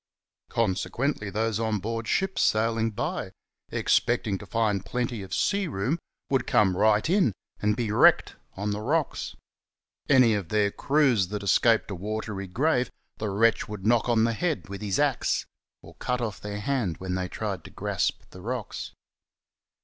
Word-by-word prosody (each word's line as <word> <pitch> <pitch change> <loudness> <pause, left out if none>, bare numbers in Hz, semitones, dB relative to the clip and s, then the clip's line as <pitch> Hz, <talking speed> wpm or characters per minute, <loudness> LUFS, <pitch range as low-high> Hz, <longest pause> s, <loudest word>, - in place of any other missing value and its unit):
Consequently 110 +3 -1
those 110 +1 -1
on 110 -1 0
board 115 +3 -4
ships 190 -1 0
sailing 115 +1 +2
by, 110 - -3 0.4
expecting 100 -3 +1
to - - -10
find 105 -4 0
plenty 120 -3 -2
of 95 -2 -9
sea 200 - +1
room, 135 - -1 0.3
would 135 -2 0
come 95 -3 +3
right 105 +4 +3
in 175 - +3 0.3
and 105 0 +2
be 115 -4 -1
wrecked - - +5 0.2
on 105 +2 -1
the 105 +1 -3
rocks. 150 +6 -1 0.7
Any 130 -5 +6
of 100 -6 -2
their 105 -1 +2
crews 135 -9 +2
that 105 +1 -4
escaped 110 +3 +3
a - - -3
watery 105 0 -4
grave 125 - +1 0.3
the 110 - -2
wretch 110 +3 +2
would 105 -2 -6
knock 120 +2 +3
on 115 -2 +4
the 115 0 +2
head 160 - -2
with 100 0 -6
his 100 -3 -1
axe, 145 -6 +1 0.4
or - - -13
cut 125 0 -2
off 110 -5 -4
their 105 0 -5
hand 110 - -1
when 95 -1 -4
they 90 0 -1
tried 100 -2 -4
to - - -9
grasp - - -2
the 90 - -11
rocks. 120 +1 -5
110 Hz, 165 wpm, -27 LUFS, 100-125 Hz, 0.7 s, Any